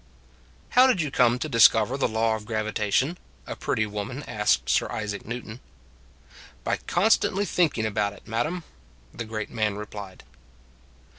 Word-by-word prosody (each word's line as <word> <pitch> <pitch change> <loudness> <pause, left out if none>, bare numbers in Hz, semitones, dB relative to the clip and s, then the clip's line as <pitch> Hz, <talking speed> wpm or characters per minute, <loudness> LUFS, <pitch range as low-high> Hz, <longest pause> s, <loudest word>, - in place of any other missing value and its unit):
" - - -30
How 255 +1 +7
did 255 -8 +2
you 150 -4 -1
come 125 -2 +3
to 140 - -3
discover 115 -2 +5
the 140 - +1
law 110 0 +1
of 105 -1 -8
gravitation?" 110 - 0 0.3
a - - -6
pretty 110 - -1
woman 105 -1 -5
asked - - +1
Sir - - +2
Isaac 105 -2 -4
Newton. 115 0 -6 0.5
" - - -22
By - - 0
constantly 205 +1 +2
thinking 165 - +1
about 105 -1 0
it, - - -17
madam," 155 +11 -2 0.5
the 115 - -5
great 110 -1 -5
man 110 -3 0
replied. 105 -2 -8
110 Hz, 155 wpm, -25 LUFS, 105-140 Hz, 0.5 s, How